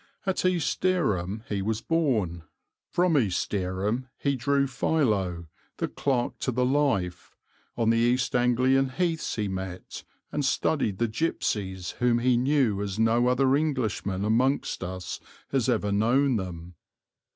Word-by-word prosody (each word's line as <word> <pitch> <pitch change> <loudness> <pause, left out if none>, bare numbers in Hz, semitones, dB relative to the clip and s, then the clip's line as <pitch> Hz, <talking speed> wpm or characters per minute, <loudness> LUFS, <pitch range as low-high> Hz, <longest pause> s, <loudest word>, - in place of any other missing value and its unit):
At 190 -1 0
East 180 -4 0
Dereham 110 - 0
he 100 -2 -2
was 110 +2 -1
born, 115 - 0 0.5
from 175 -2 +2
East 110 -10 +1
Dereham 100 +6 -1
he 140 -1 0
drew 140 +3 +1
Philo 105 - 0 0.3
the - - -1
clerk 130 -4 -1
to 130 - -1
the 125 +1 +1
life, 125 -11 0 0.4
on 115 -1 +3
the 115 - +2
East 125 +2 +1
Anglian 130 +2 +3
heaths 165 +3 -1
he 105 -2 -1
met 95 -1 -6 0.3
and 145 - -1
studied 135 -6 0
the 115 - +1
gipsies 100 - -2
whom 120 -1 +3
he 125 +1 +3
knew 125 -5 +2
as 100 -1 -3
no 115 +2 +3
other 130 +1 +3
Englishman 115 -10 -1
amongst 125 +1 +1
us 90 0 -5 0.3
has 130 -2 +1
ever 105 -4 +1
known 120 +6 +3
them. 90 -2 -6
120 Hz, 140 wpm, -27 LUFS, 100-135 Hz, 0.5 s, on